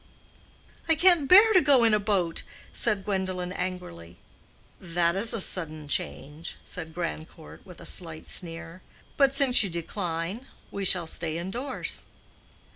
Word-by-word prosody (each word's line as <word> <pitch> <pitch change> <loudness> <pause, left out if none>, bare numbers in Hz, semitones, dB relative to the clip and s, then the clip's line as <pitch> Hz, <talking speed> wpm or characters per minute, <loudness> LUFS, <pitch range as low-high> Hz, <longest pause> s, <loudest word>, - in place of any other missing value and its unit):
"I 325 - +5
can't 345 -3 +4
bear 420 +4 +8
to 370 - +6
go 275 -5 +5
in 225 -2 +4
a 210 - +4
boat," 195 -5 0 0.3
said 210 -4 +1
Gwendolen, 185 -3 -2
angrily. 135 - -6 0.6
"That 170 -1 0
is 210 +4 +2
a 230 - -1
sudden 155 -5 -1
change," 145 +4 -5
said 160 -3 -7
Grandcourt, 165 -2 -6
with 180 - -12
a - - -11
slight 165 -3 -2
sneer. 170 0 -3 0.3
"But, 275 -1 +3
since 270 -3 +4
you 200 - -1
decline, 170 +5 -4 0.2
we 200 -1 -4
shall 180 -2 +3
stay 160 0 -3
indoors." 240 +10 -4
180 Hz, 140 wpm, -27 LUFS, 165-225 Hz, 0.6 s, bear